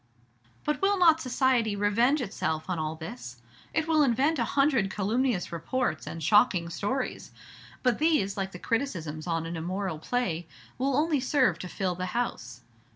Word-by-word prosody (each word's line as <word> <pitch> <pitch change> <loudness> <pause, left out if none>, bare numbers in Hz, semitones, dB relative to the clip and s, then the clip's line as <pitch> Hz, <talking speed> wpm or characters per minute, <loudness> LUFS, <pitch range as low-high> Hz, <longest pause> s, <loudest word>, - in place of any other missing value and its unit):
"But 300 -1 -1
will 400 +1 +3
not 325 -3 +5
society 250 -4 +1
revenge 230 +8 +2
itself 160 -8 -2
on 175 - -1
all 155 0 -2
this?" 125 -6 -8 0.3
"It 315 - 0
will 315 -2 +4
invent 275 +3 +2
a - - +2
hundred 270 -8 +3
calumnious 215 +1 0
reports 170 - -2
and 165 -1 -6
shocking 180 -1 +4
stories; 250 +10 -3 0.5
but 250 -3 +2
these, 300 -12 +2
like 195 -1 -3
the 180 - -8
criticisms 175 - -3
on 165 -1 -1
an 165 +1 -4
immoral 180 0 -3
play, 175 -5 -2 0.3
will 270 +1 +1
only 305 -1 +2
serve 255 - +2
to 180 - -5
fill 185 0 -2
the 180 +1 -4
house. 245 - -3
210 Hz, 160 wpm, -28 LUFS, 170-265 Hz, 0.5 s, not